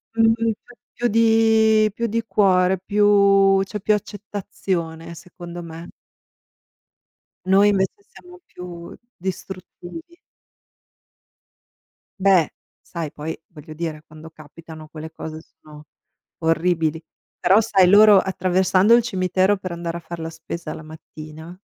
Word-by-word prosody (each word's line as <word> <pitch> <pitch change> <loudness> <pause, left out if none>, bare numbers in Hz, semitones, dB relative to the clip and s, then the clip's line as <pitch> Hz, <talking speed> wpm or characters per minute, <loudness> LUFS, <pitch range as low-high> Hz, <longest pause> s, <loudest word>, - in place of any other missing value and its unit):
Mh-mh, 225 0 +2
c'è 245 - -18 0.2
più 240 - 0
di 220 -1 +3
più 235 +2 -2
di 230 +2 -2
cuore, 185 -2 +2
più 200 -1 +4
c'è 210 +2 -6
più 210 +2 +1
accettazione 190 -5 -5
secondo 175 0 -10
me. 165 +1 -10 1.6
Noi 195 +2 +4
invece 200 - -1
siamo 360 0 -15
più 175 -1 -10 0.2
distruttivi. 190 - -8 2.0
Beh, 185 -5 +4 0.3
sai 165 -4 -6
poi, 155 +2 -5
voglio 155 -1 -12
dire, 155 -1 -5
quando 155 +1 -13
capitano 155 0 -13
quelle 160 0 -9
cose 160 0 -8
sono 150 -2 -17 0.5
orribili, 165 -1 0 0.4
però 195 +5 +4
sai 195 -4 +3
loro, 205 0 +7
attraversando 190 +2 +2
il 240 - +3
cimitero 190 -2 +1
per 185 -2 -7
andare 170 0 -5
a 170 - -10
far 170 0 -8
la 160 0 -5
spesa 160 0 -7
la 155 - -10
mattina 160 +2 -12
185 Hz, 120 wpm, -21 LUFS, 165-205 Hz, 2.0 s, loro